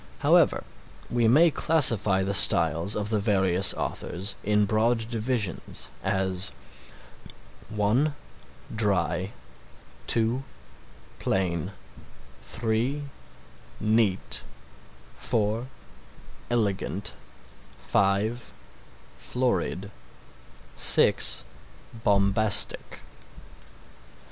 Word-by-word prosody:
However, - - +3 0.5
we 120 -1 +1
may 155 +8 +4
classify 115 - +3
the 100 +1 -3
styles 85 0 +6
of 105 +1 -3
the 110 - 0
various 95 -2 +2
authors 95 +3 -3
in 105 0 +1
broad 110 +2 0
divisions 110 -4 -3
as 95 0 0 1.2
(1) 110 +8 0 0.6
dry, 95 -3 0 0.8
(2) 115 +3 +1 0.8
plain, 90 -1 -2 0.7
(3) 115 +5 -3 0.8
neat, 105 - +1 0.7
(4) 110 +3 -2 0.8
elegant, 100 -4 -2 0.6
(5) 100 +5 -1 0.6
florid, 100 -5 -3 0.8
(6) - - +2 0.6
bombastic. 100 +1 +1
105 Hz, 65 wpm, -25 LUFS, 95-115 Hz, 1.2 s, styles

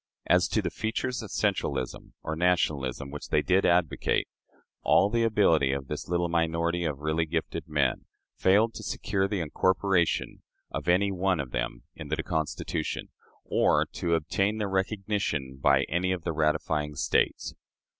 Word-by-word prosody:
As 90 +1 +4
to 110 - 0
the 85 - -2
features 120 +3 -2
of 110 - -8
centralism, 65 - -2
or 80 - -3
nationalism, 75 -6 0
which 75 - -7
they 75 - +2
did 95 +1 +3
advocate, 85 -2 +1 0.5
all 100 - +4
the 115 0 +2
ability 90 -11 +3
of 70 -1 -4
this 75 +1 -4
little 85 0 +1
minority 85 +1 0
of 75 -4 -2
really 80 +2 0
gifted 80 +1 -3
men 70 -4 0 0.3
failed 105 +4 +3
to - - -8
secure 95 0 -1
the 100 -2 -2
incorporation 90 +2 +1 0.3
of - - -5
any 95 +3 +3
one 95 -2 0
of 65 -4 -4
them - - -3
into - - -3
the - - -3
Constitution, 80 -2 -3 0.4
or - - +3
to 85 -1 0
obtain 95 +6 0
their 105 -2 -2
recognition 95 -9 -2
by 70 -1 +4
any 90 +4 0
of 90 -3 -2
the 85 - -2
ratifying 75 -1 0
States. - - 0
85 Hz, 155 wpm, -28 LUFS, 75-95 Hz, 0.5 s, As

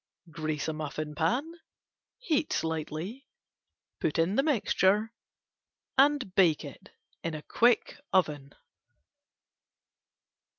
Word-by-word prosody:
Grease 155 -1 -3
muffin 155 -1 -4
pan, 170 - 0 0.7
heat 320 - 0
slightly, 160 - -3 0.7
put 155 - -1
in 165 +4 +2
mixture 220 -5 +2 0.8
and 275 -7 +3
bake 170 -6 +3
in 155 -2 -9
quick 240 +4 +2
oven. 150 -6 0
175 Hz, 75 wpm, -29 LUFS, 155-245 Hz, 0.8 s, and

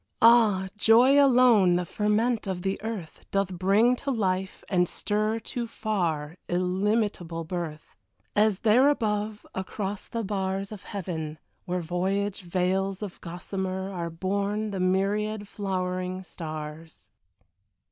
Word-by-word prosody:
Ah, 220 -5 +6
joy 250 +7 +6
alone, 240 -9 +5
the 175 0 0
ferment 215 +4 0
of 180 -2 -3
the 195 0 -1
earth, 215 -7 -6
Doth 195 -1 0
bring 200 +7 +3
to 280 - -4
life 190 -6 -1
and 180 -2 +2
stir 215 +2 -1
To 235 +1 -4
far, 175 -9 -2
illimitable 185 -1 0
birth; 165 -2 -6 0.4
As 210 -2 +3
there 245 +5 +5
above, 215 -5 -1
across 195 +1 -4
the 230 -1 -3
bars 195 0 -2
Of 210 -3 -9
heaven, 160 -6 -4 0.3
where 180 -1 -1
voyage 190 +4 -1
veils 190 +2 -1
of 200 -4 -7
gossamer, 190 +2 -4
Are 170 -3 -3
born 200 +5 -1
the 195 - -3
myriad 205 +3 0
flowering 185 -2 -3
stars. 155 -2 -8
195 Hz, 125 wpm, -27 LUFS, 180-215 Hz, 0.4 s, Ah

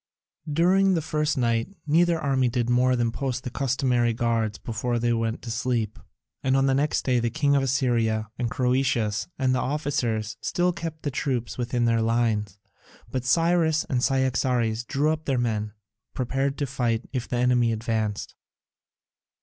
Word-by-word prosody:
During 185 +5 +3
the 165 - 0
first 150 -1 0
night 115 +8 0
neither 165 +2 +3
army 135 -3 +1
did 120 0 -1
more 125 +1 +3
than 120 -1 0
post 130 0 -3
the 125 - -5
customary 125 -3 +1
guards 115 -2 0
before 120 +1 -2
they 120 0 +1
went 115 0 -2
to 120 - -5
sleep, 115 -3 -1 0.4
and 135 0 +2
on 135 - +3
the 135 - +3
next 145 +3 +1
day 125 -2 +2
the 120 0 0
king 145 +1 +1
of 140 - +3
Assyria, 120 -5 +1
and 120 -1 -2
Croesus, 125 -4 0
and 130 -1 +1
their 130 - +1
officers, 125 -7 -1
still 180 0 +1
kept 165 -2 -6
the 145 - -1
troops 125 -3 -2
within 120 0 0
their 115 -1 +2
lines. 110 -4 0 0.5
But 130 -1 -3
Cyrus 165 +2 +3
and 125 -2 +1
Cyaxares 125 -4 +1
drew 145 +6 +1
up 160 0 -3
their 135 -2 0
men, 110 -3 -1 0.4
prepared 135 +2 -1
to 145 - -1
fight 120 -4 -1
if 125 -3 -2
the 125 - -2
enemy 125 -1 +3
advanced. 110 -2 -2
125 Hz, 165 wpm, -25 LUFS, 115-140 Hz, 0.5 s, During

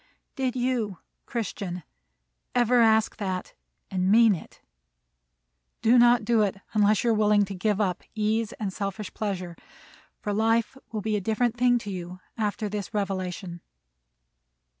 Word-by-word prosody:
Did 260 -2 -1
you, 245 -6 -1 0.3
Christian, 200 -6 -4 0.7
ever 245 0 +4
ask 220 -1 +3
that 185 -3 -4 0.4
and 185 0 +1
mean 225 0 +6
it? 170 - -9 1.2
Do 240 +2 +6
not 240 -2 +5
do 230 -1 +3
it 200 -2 0 0.2
unless 210 -1 +3
you 235 - +3
are - - +4
willing 210 -1 +3
to 195 - -7
give 205 +2 0
up 190 -3 0
ease 215 +1 0
and 205 -7 -4
selfish 200 +1 -4
pleasure; 185 -5 -3 0.6
for 205 - -3
life 225 +3 +1 0.2
will 215 -2 -3
be 215 +1 -1
a - - -3
different 225 +4 0
thing 245 0 +3
to 205 -4 -5
you 180 0 -6 0.2
after 215 -1 -2
this 205 +1 -5
revelation. 185 -3 -3
210 Hz, 145 wpm, -26 LUFS, 195-230 Hz, 1.2 s, mean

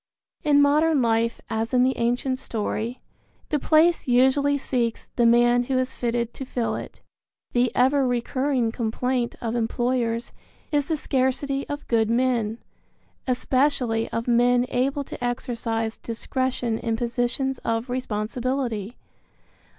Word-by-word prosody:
In 290 -2 +5
modern 300 +1 +3
life 230 0 +1
as 225 +2 -2
in 250 - +5
the 260 +1 +2
ancient 245 +2 0
story, 225 +2 -3 0.5
the 300 - +1
place 320 +2 +3
usually 265 +3 +3
seeks 240 -4 -2
the 235 -1 +4
man 240 +1 +4
who 260 +1 0
is 255 0 0
fitted 235 -1 -2
to - - -6
fill 245 -3 -2
it. - - -8 0.5
The 245 -1 +2
ever 265 +2 +3
recurring 250 0 0
complaint 240 +1 -1
of 230 0 -2
employers 235 0 -1 0.4
is 290 -2 +1
the 320 - 0
scarcity 275 +1 -1
of 290 0 -5
good 225 -2 +2
men, 235 -2 +1 0.7
especially 255 -2 +1
of 230 +1 -3
men 245 +1 +4
able 275 +3 0
to - - -8
exercise 230 -2 -2
discretion 240 0 -2
in 230 -1 -1
positions 245 +3 -1
of 230 +2 -2
responsibility. 245 -1 -2
245 Hz, 130 wpm, -24 LUFS, 230-265 Hz, 0.7 s, In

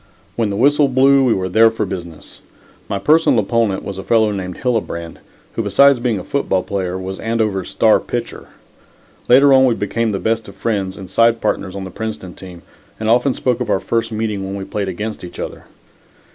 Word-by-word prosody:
When 115 -3 0
the 100 - -3
whistle 145 +6 +3
blew, 135 +1 +4
we 125 -3 +3
were 95 -1 -2
there 110 +5 +5
for 110 -1 -3
business. 85 -4 -8 0.5
My 100 - -1
personal 155 +4 +3
opponent 110 -1 0
was 100 -1 -6
a - - -6
fellow 110 -2 +2
named 95 -3 -5
Hillebrand, 105 -9 -3 0.3
who - - -2
besides 125 +6 +4
being 120 -3 0
a 90 - -6
football 95 -10 -1
player 95 -2 -3
was 95 +1 -6
Andover's 110 -5 -1
star - - +3
pitcher. - - -6 0.8
Later 135 +3 +6
on 130 0 +6
we 120 -3 +2
became 110 +2 -1
the 100 - -1
best 110 +2 -1
of - - -12
friends 100 -4 -2
and 95 -2 -9
side 115 +5 +3
partners 95 -4 -2
on 100 - -5
the 95 - -8
Princeton 105 -3 -6
team, 90 -2 -12 0.4
and 110 0 0
often 125 +2 +2
spoke 125 -1 -1
of 120 - -3
our 95 - +2
first 115 +2 -2
meeting 110 -2 -3
when 95 +1 -5
we 95 -1 -5
played 100 0 -3
against 105 +3 -5
each 90 - -9
other. - - -7
110 Hz, 200 wpm, -18 LUFS, 95-115 Hz, 0.8 s, Later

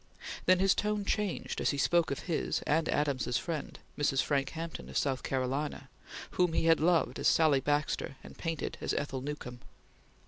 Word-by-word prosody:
Then 185 - +6
his 195 +1 +4
tone 210 -1 -1
changed 205 -3 -1
as - - +2
he 140 - -1
spoke 170 +4 +3
of 140 - -3
his 170 -4 -1
and 160 +2 +1
Adams's 140 -4 +1
friend, 165 -4 -4 0.2
Mrs. 140 -2 +1
Frank 140 -2 0
Hampton, 165 0 -6
of - - -3
South 135 -3 0
Carolina, 135 +3 -2 0.4
whom 180 -2 +2
he 165 - +1
had 165 -1 +5
loved 170 +1 +2
as - - +2
Sally 155 -4 +5
Baxter 145 -1 -1
and - - -11
painted 165 -3 -4
as - - -1
Ethel 135 -2 -2
Newcome. 130 -3 -6
150 Hz, 175 wpm, -31 LUFS, 140-170 Hz, 0.4 s, Then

